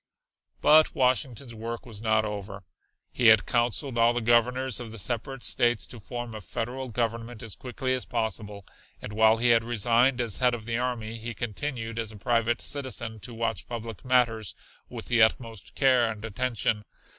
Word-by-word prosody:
But 155 +1 +6
Washington's 125 -1 0
work 115 +1 -6
was 110 -4 -9
not 110 -1 +2
over. 100 -1 -6 0.5
He 120 - +2
had 110 -1 +7
counseled 120 +1 0
all 115 +1 +5
the 120 - 0
Governors 120 +2 +2
of 120 -2 -6
the 115 - -8
separate 120 +4 -3
States 120 -2 +2
to 120 - -11
form 120 +2 -6
a 110 - -7
Federal 125 +6 -4
Government 115 0 -3
as 110 -4 -7
quickly 130 +1 -3
as 130 - -1
possible, 110 -4 -3 0.3
and 105 - -8
while 110 +1 +5
he 120 +1 +3
had 115 -1 +5
resigned 120 +3 +2
as 115 -4 0
head 125 -1 +3
of 110 -2 -9
the 115 0 -1
army, 115 -3 -3
he 115 +1 -5
continued, 115 +1 -4
as 110 -1 -3
a 105 - -11
private 115 +2 +1
citizen, 120 -6 -3
to 120 - -7
watch 115 -1 -3
public 115 -3 -6
matters 120 -5 +1 0.3
with - - -7
the 120 -1 +2
utmost 110 -2 +1
care 130 -4 +4
and 110 0 -7
attention. 110 -1 -1
115 Hz, 180 wpm, -27 LUFS, 110-125 Hz, 0.5 s, had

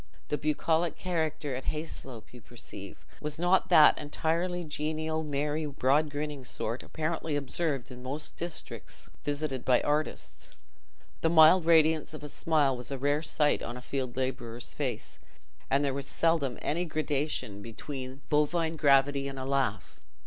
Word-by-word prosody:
The 150 - 0
bucolic 160 +2 +1
character 160 -5 -2
at 130 - -6
Hayslope, 135 -8 -5
you 125 - -11
perceive, 120 -5 -9 0.2
was 150 0 -3
not 175 +3 +3
of - - -22
that 155 -4 +7
entirely 170 +4 -1
genial, 155 +1 -2
merry, 150 +1 -1
broad 145 +2 +2
grinning 145 -1 -4
sort, 120 0 -3
apparently 160 -1 -2
observed 140 -2 -2
in 125 0 -9
most 140 +4 -5
districts 170 -1 -7
visited 145 -3 -2
by 125 -1 +4
artists. 150 +1 -2 0.7
The 165 - +3
mild 160 +2 +7
radiance 160 -1 +4
of 150 - -9
a 150 - -6
smile 145 -3 +2
was 125 0 -7
a 135 - -3
rare 145 +3 +1
sight 150 -2 +2
on 120 +1 -5
a - - -8
field 130 -1 -3
labourer's 120 -2 -3
face, - - -4 0.5
and 140 +2 +3
there 140 - 0
was 140 0 -4
seldom 160 -6 +1
any 170 +4 0
gradation 150 - -1
between 130 +4 -7
bovine 160 +2 +1
gravity 140 -1 +4
and 135 0 -6
a 130 - -4
laugh. 135 -7 -1
150 Hz, 155 wpm, -30 LUFS, 135-160 Hz, 0.7 s, that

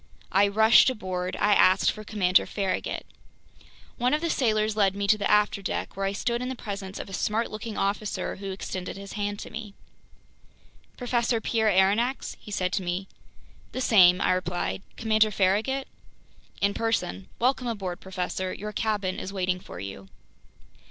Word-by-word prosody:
I 200 +1 +5
rushed 220 +5 +6
aboard. 185 -6 -3
I 205 0 +4
asked 185 -1 +5
for 215 - -9
Commander 190 -4 +2
Farragut. 195 -2 -2 0.9
One 250 +4 +3
of 305 - -3
the 335 -1 0
sailors 215 -4 +1
led 200 -2 +2
me 200 0 -2
to 215 - +5
the 200 - 0
afterdeck, 210 -2 +1
where 195 0 -1
I - - 0
stood 235 +4 -1
in 250 - -3
the 260 - -3
presence 200 -4 -6
of - - -6
a 195 - -10
smart 215 +4 -1
looking 215 0 -6
officer 205 +1 -2
who 195 0 -6
extended 190 -1 -5
his 200 0 -9
hand 205 -1 -2
to - - -8
me. 215 -3 -7 1.2
"Professor 240 -2 0
Pierre 220 -1 +1
Aronnax?" 205 +7 +2
he - - -13
said 185 -2 -1
to - - 0
me. 180 +2 -3 0.7
"The - - -3
same," 185 -7 +6
I - - +3
replied. 180 +1 -1 0.2
"Commander 220 -1 +3
Farragut?" 210 +8 +1 0.7
"In 200 0 +2
person. 215 - -1
Welcome 250 +1 +1
aboard, 195 -6 -3
professor. 185 0 -3
Your 210 +1 -6
cabin 205 -3 -1
is 190 - -5
waiting 185 -2 -1
for 90 - -10
you." 95 0 -8
205 Hz, 165 wpm, -26 LUFS, 190-220 Hz, 1.2 s, rushed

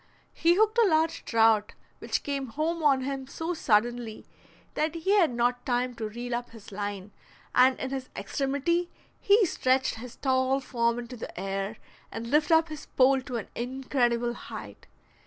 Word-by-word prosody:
He 340 +1 +3
hooked 435 +3 +3
a 455 - +6
large 320 -1 +1
trout, 225 -2 +3 0.3
which - - -2
came 275 -2 -3
home 315 +7 -2
on 275 -3 +4
him 270 0 -4
so 325 +5 -3
suddenly 235 -4 0 0.5
that 310 +1 -1
he 335 +4 -1
had 385 -6 +5
not 245 +1 0
time 250 0 0
to 220 -2 -5
reel 240 +3 -5
up 240 0 -3
his 225 -3 -13
line, 205 0 -5 0.4
and 255 +1 +5
in 265 - -4
his 265 -1 -4
extremity 285 +6 -1 0.3
he 405 +1 +5
stretched 260 -6 +1
his 245 0 -9
tall 260 0 +1
form 235 -3 0
into 245 +1 -7
the 220 - -8
air 195 +2 -3 0.3
and 230 +1 -6
lifted 300 +2 +4
up 320 0 +3
his 310 -2 -8
pole 265 +1 +3
to 255 -1 -5
an 220 - -6
incredible 245 -1 0
height. - - -10
260 Hz, 170 wpm, -28 LUFS, 235-305 Hz, 0.5 s, a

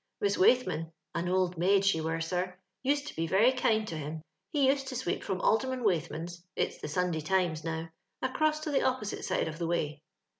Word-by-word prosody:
Miss 200 0 +2
Waithman 175 -8 +3 0.2
(on 170 +2 -1
old 180 -2 +1
maid 195 +2 +4
she 180 -5 +3
were, 160 +1 -1
sir) 180 +2 -2 0.2
used 285 +2 +1
to - - -7
be 165 0 -1
very 200 +9 +5
kind 220 -4 +1
to 165 - -4
him. 155 +1 -5 0.3
He 280 +2 +2
used 270 0 +2
to 260 - -4
sweep 255 - -2
from 190 -2 -2
Alderman 260 +2 +1
Waithman's 170 -2 -1
(it's - - -1
the - - -5
Sunday 170 +1 0
Tlmt» 170 -2 +1
now) 165 0 -3 0.3
across 305 +4 +1
to 310 - -3
the 275 - +3
opposite 255 -5 -1
side - - 0
of 160 +1 -6
the 170 - -1
way. 155 -3 -1
185 Hz, 200 wpm, -30 LUFS, 165-250 Hz, 0.3 s, very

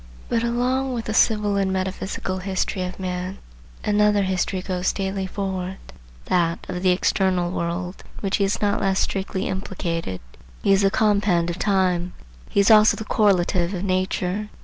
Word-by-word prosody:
But 230 - +1
along 250 +3 0
with 230 -2 -3
the 215 - -2
civil 210 -2 +3
and 195 -1 +1
metaphysical 190 0 -3
history 190 0 -2
of 180 +1 -4
man, 185 0 -4 0.5
another 210 -1 +3
history 185 0 -1
goes 180 -1 0
daily 195 -1 -3
forward,—that 180 - -3
of 180 -1 -4
the 185 - +3
external 180 -1 +1
world,—in 175 +1 -3 0.2
which 195 -1 0
he 200 - +1
is 195 +1 0
not 205 -1 +1
less 195 -1 +1
strictly 190 0 -1
implicated. 170 - -3 0.4
He 195 - +4
is 195 - +4
the 195 - +4
compend 200 -5 +2
of 170 - -7
time; 185 -3 +1 0.4
he - - +1
is 200 +3 +5
also 215 0 +6
the 220 - -6
correlative 185 -3 +2
of 180 - -4
nature. 185 +2 -1
190 Hz, 160 wpm, -23 LUFS, 180-205 Hz, 0.5 s, also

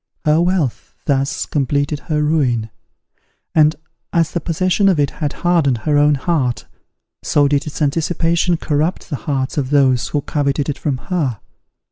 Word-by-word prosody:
Her 155 +2 +4
wealth, 175 -8 -1
thus 135 -1 0
completed 145 +1 -1
her 150 -1 +1
ruin; 125 -8 +1 0.8
and, 155 0 +4 0.4
as 165 -2 +1
the 170 - -1
possession 185 +5 +1
of 180 -5 +2
it 140 -1 +1
had 145 -2 0
hardened 160 -8 +3
her 150 - +2
own 145 0 +4
heart, 135 -4 -1 0.6
so 145 -1 +2
did 145 +1 0
its 150 - -6
anticipation 165 +3 +1
corrupt 155 +4 -1
the - - 0
hearts 135 0 -1
of 130 -2 -2
those 135 -4 +3
who 145 - -1
coveted 140 0 -1
it 140 - -3
from 140 -4 -1 0.2
her. 135 - 0
150 Hz, 155 wpm, -18 LUFS, 140-165 Hz, 0.8 s, Her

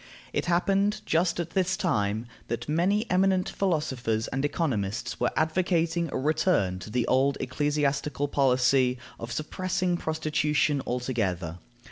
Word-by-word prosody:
It - - -1
happened, 195 +4 +2
just 170 +2 +1
at 170 -1 -3
this 190 0 +1
time, 105 - 0 0.2
that 120 0 -4
many 185 +8 +1
eminent 185 0 +3
philosophers 130 - -1
and 135 +1 -2
economists 120 - -1
were 120 - +2
advocating 170 0 +1
a - - -2
return 140 - +1
to 110 - -9
the 120 +1 0
old 135 +2 +2
ecclesiastical 145 +1 0
policy 130 -2 +3 0.2
of 115 +1 -6
suppressing 180 +5 -1
prostitution 150 -3 0
altogether. 100 -9 -2
145 Hz, 125 wpm, -27 LUFS, 125-175 Hz, 0.2 s, eminent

